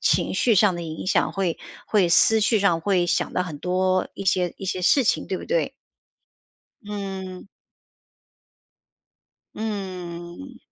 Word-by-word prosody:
情 -, -, +1 dB
绪 235 Hz, -, +3 dB
上 200 Hz, -2 st, +4 dB
的 170 Hz, -, -5 dB
影 160 Hz, -1 st, -6 dB
响， -, -, +2 dB
会 185 Hz, -4 st, -1 dB, 0.3 s
会 200 Hz, -5 st, +3 dB
思 220 Hz, +6 st, +5 dB
绪 215 Hz, 0 st, +2 dB
上 175 Hz, -4 st, +2 dB
会 180 Hz, 0 st, +1 dB
想 175 Hz, -, 0 dB
得 180 Hz, -, 0 dB
很 160 Hz, -5 st, -7 dB
多 185 Hz, +3 st, 0 dB
一 195 Hz, -, -6 dB
些 180 Hz, -1 st, +1 dB
一 -, -, -8 dB
些 185 Hz, -1 st, -2 dB
事 265 Hz, +10 st, +4 dB
情， 235 Hz, -, 0 dB
对 -, -, -2 dB
不 -, -, -8 dB
对？ -, -, 0 dB, 1.1 s
嗯。 195 Hz, -3 st, -6 dB, 2.1 s
嗯， 190 Hz, +2 st, -6 dB
185 Hz, 150 characters per minute, -24 LUFS, 175-205 Hz, 2.1 s, 思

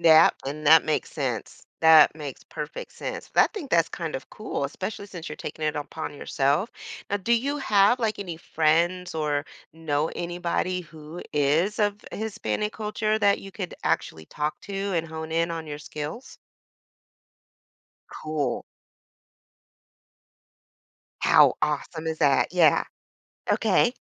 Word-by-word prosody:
Yep, 160 Hz, -2 st, +7 dB
and 150 Hz, +2 st, -4 dB
that 160 Hz, +2 st, +8 dB
makes 155 Hz, -, -1 dB
sense. 125 Hz, -7 st, -3 dB, 0.2 s
That 160 Hz, -2 st, +8 dB
makes 145 Hz, -4 st, -7 dB
perfect -, -, -7 dB
sense, -, -, -6 dB
but -, -, +6 dB
I -, -, +1 dB
think 320 Hz, -10 st, -6 dB
that's 165 Hz, -1 st, +4 dB
kind 165 Hz, -4 st, -4 dB
of 130 Hz, -, -10 dB
cool, 215 Hz, -9 st, -4 dB
especially 190 Hz, +8 st, -5 dB
since 175 Hz, -4 st, -8 dB
you're 150 Hz, -, -7 dB
taking 155 Hz, -, -6 dB
it 150 Hz, 0 st, 0 dB
upon 150 Hz, +1 st, -5 dB
yourself. 145 Hz, -, 0 dB, 0.4 s
Now 205 Hz, -, +1 dB
do 230 Hz, +5 st, 0 dB
you 275 Hz, +5 st, +1 dB
have, 215 Hz, -1 st, +4 dB
like, 220 Hz, -2 st, 0 dB
any 180 Hz, -5 st, -5 dB
friends 170 Hz, +3 st, +1 dB
or 150 Hz, -2 st, 0 dB, 0.3 s
know 155 Hz, -1 st, -1 dB
anybody 175 Hz, +1 st, -1 dB
who 160 Hz, 0 st, -10 dB
is 150 Hz, +9 st, +2 dB
of 205 Hz, 0 st, 0 dB
Hispanic 210 Hz, 0 st, -2 dB
culture 215 Hz, 0 st, -1 dB
that 200 Hz, 0 st, +4 dB
you 195 Hz, -, -10 dB
could 185 Hz, -3 st, -5 dB
actually 80 Hz, -1 st, -1 dB
talk 150 Hz, +1 st, -3 dB
to 200 Hz, -, -7 dB, 0.2 s
and 165 Hz, -1 st, 0 dB
hone 160 Hz, 0 st, -6 dB
in 165 Hz, +1 st, +1 dB
on 165 Hz, -1 st, -5 dB
your 145 Hz, -, -5 dB
skills? 150 Hz, -, -7 dB, 1.7 s
Cool. 150 Hz, -5 st, -2 dB, 2.6 s
How -, -, +6 dB
awesome 155 Hz, +2 st, -2 dB
is 160 Hz, -1 st, -2 dB
that, 140 Hz, -4 st, +3 dB
yeah. 170 Hz, -5 st, +5 dB, 0.7 s
Okay. -, -, +3 dB
165 Hz, 140 wpm, -26 LUFS, 150-200 Hz, 2.6 s, that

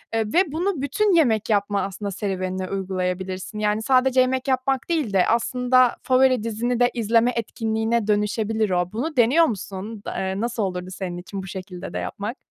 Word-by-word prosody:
ııı, 225 Hz, -, +2 dB
ve 355 Hz, -3 st, +3 dB
bunu 335 Hz, -1 st, -1 dB
bütün 390 Hz, +9 st, +1 dB
yemek 230 Hz, -10 st, +2 dB
yapma 205 Hz, -1 st, +1 dB
aslında 200 Hz, +1 st, -4 dB
serüvenine 185 Hz, -2 st, -3 dB
uygulayabilirsin, 185 Hz, +1 st, -3 dB
yani, 210 Hz, +1 st, +1 dB
sadece 260 Hz, +1 st, +3 dB
yemek 260 Hz, +1 st, 0 dB
yapmak 265 Hz, +1 st, 0 dB
değil 305 Hz, -11 st, 0 dB
de 185 Hz, -2 st, +3 dB
aslında 250 Hz, +2 st, +3 dB
favori 255 Hz, -3 st, +3 dB
dizini 235 Hz, +2 st, -1 dB
de 245 Hz, -, +4 dB
izleme 230 Hz, +1 st, +2 dB
etkinliğine 225 Hz, 0 st, -1 dB
dönüşebilir 215 Hz, +1 st, 0 dB
o. 180 Hz, 0 st, 0 dB
Bunu 295 Hz, +9 st, -3 dB
deniyor 265 Hz, +8 st, +5 dB
musun? 205 Hz, -, -5 dB
Da -, -, -4 dB
eee, 190 Hz, +2 st, -2 dB
nasıl 235 Hz, -2 st, -1 dB
olurdu 180 Hz, -1 st, -3 dB
senin 180 Hz, -2 st, -5 dB
için 190 Hz, +2 st, -7 dB
bu -, -, -8 dB
şekilde 185 Hz, -1 st, -7 dB
de -, -, -3 dB
yapmak? 210 Hz, +5 st, -5 dB
220 Hz, 175 wpm, -23 LUFS, 195-255 Hz, -, deniyor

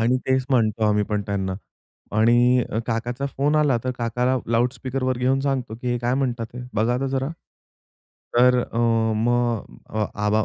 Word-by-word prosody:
आणि 120 Hz, +3 st, +3 dB
तेच 130 Hz, 0 st, +2 dB
म्हणतो 110 Hz, -4 st, +2 dB
आम्ही 105 Hz, 0 st, +2 dB
पण 105 Hz, -1 st, -2 dB
त्यांना. 95 Hz, -2 st, -2 dB, 0.6 s
आणि 120 Hz, +3 st, +4 dB
अ, 110 Hz, -, -1 dB
काकाचा 120 Hz, +4 st, -2 dB
फोन 140 Hz, +2 st, 0 dB
आला 145 Hz, -4 st, +3 dB
तर 130 Hz, -, 0 dB
काकाला 125 Hz, +2 st, 0 dB
लाउडस्पीकरवर 125 Hz, +2 st, 0 dB
घेऊन 130 Hz, +2 st, +2 dB
सांगतो, 135 Hz, -4 st, -2 dB
की 125 Hz, +2 st, -5 dB
हे 120 Hz, -, -1 dB
काय 120 Hz, +1 st, 0 dB
म्हणतात 125 Hz, -4 st, -1 dB
हे, 125 Hz, -, -6 dB
बघा 115 Hz, +3 st, +1 dB
तर 135 Hz, -, 0 dB
जरा. 135 Hz, +1 st, -1 dB, 1.1 s
तर 125 Hz, +1 st, +5 dB
अ, 115 Hz, -, -5 dB, 0.4 s
मग 120 Hz, 0 st, +1 dB, 0.5 s
आबा 105 Hz, +1 st, +1 dB
120 Hz, 160 wpm, -23 LUFS, 115-130 Hz, 1.1 s, तर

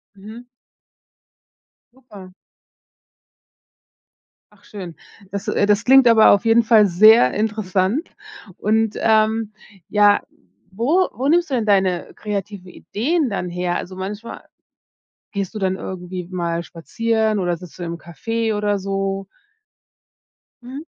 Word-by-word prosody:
Mhm. 220 Hz, +5 st, -12 dB, 1.5 s
Super. 210 Hz, -8 st, -14 dB, 2.2 s
Ach -, -, -25 dB
schön. 185 Hz, -5 st, -9 dB, 0.4 s
Das 200 Hz, +2 st, -5 dB
äh, 205 Hz, -1 st, +1 dB
das 210 Hz, +1 st, +2 dB
klingt 265 Hz, 0 st, +6 dB
aber 225 Hz, -2 st, +6 dB
auf 200 Hz, +2 st, +2 dB
jeden 230 Hz, +1 st, +4 dB
Fall 220 Hz, -2 st, +5 dB
sehr 195 Hz, -, +6 dB
interessant. 210 Hz, -, -1 dB, 0.5 s
Und, 220 Hz, +1 st, 0 dB
ähm, 220 Hz, 0 st, +1 dB, 0.4 s
ja, 205 Hz, -1 st, +4 dB, 0.5 s
wo 285 Hz, -, +1 dB
wo 265 Hz, +3 st, -3 dB
nimmst 340 Hz, +1 st, +2 dB
du 265 Hz, -, -1 dB
denn 225 Hz, -3 st, -1 dB
deine 190 Hz, -4 st, +1 dB
kreative 200 Hz, -2 st, -6 dB
Ideen 280 Hz, -, -2 dB
dann 180 Hz, -3 st, -4 dB
her? 175 Hz, 0 st, -2 dB
Also, 185 Hz, -, -6 dB
manchmal 205 Hz, +5 st, -7 dB, 0.9 s
gehst 200 Hz, 0 st, -4 dB
du -, -, -4 dB
dann 190 Hz, -2 st, -1 dB
irgendwie 180 Hz, -1 st, -7 dB
mal 170 Hz, -2 st, -2 dB
spazieren 220 Hz, +5 st, -2 dB
oder 175 Hz, -2 st, -1 dB
sitzt 180 Hz, +1 st, -13 dB
du -, -, -7 dB
im 170 Hz, 0 st, -5 dB
Café 225 Hz, +6 st, -3 dB
oder 205 Hz, -1 st, 0 dB
so? 195 Hz, 0 st, -3 dB, 1.4 s
Mhm. 265 Hz, +4 st, -8 dB
205 Hz, 125 wpm, -20 LUFS, 185-225 Hz, 2.2 s, klingt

